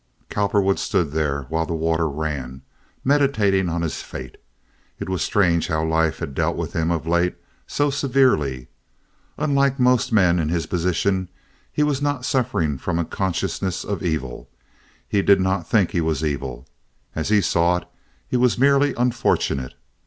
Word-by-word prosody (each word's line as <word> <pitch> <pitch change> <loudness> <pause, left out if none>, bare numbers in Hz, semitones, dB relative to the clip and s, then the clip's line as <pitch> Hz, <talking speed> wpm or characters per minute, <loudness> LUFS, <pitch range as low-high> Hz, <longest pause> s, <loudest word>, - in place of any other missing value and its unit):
Cowperwood 100 -1 +1
stood 90 - 0
there 75 -2 -1
while 80 +5 -2
the 85 - -2
water 80 0 0
ran, 70 -3 -4 0.4
meditating 110 -10 +2
on 85 0 -2
his 80 - -3
fate. 65 -1 -9 0.6
It - - -6
was 95 -3 -1
strange 85 -5 +2
how 80 0 0
life 80 0 +1
had 70 - -5
dealt - - 0
with - - -4
him 80 0 0
of 85 -2 -1
late—so 90 - -1
severely. 125 - +1 0.7
Unlike 140 -2 +1
most 125 -1 +3
men 90 -5 +4
in 80 -2 0
his 85 -2 -1
position, 90 +2 0 0.4
he 150 - +1
was 145 -2 0
not 145 -3 -1
suffering 100 - 0
from 85 +2 -2
a 85 - 0
consciousness 95 0 -2
of 100 -5 -4
evil. 65 -8 -3 0.6
He 100 - +1
did 100 0 +5
not 95 -2 -1
think 100 -6 +3
he 85 - 0
was 80 -2 -1
evil. 70 -3 -4 0.5
As 80 +5 -3
he 105 -1 +5
saw 85 -1 +2
it, - - -7 0.4
he - - 0
was 125 -1 +2
merely 140 +1 +3
unfortunate. 115 - 0
90 Hz, 160 wpm, -22 LUFS, 80-115 Hz, 0.7 s, did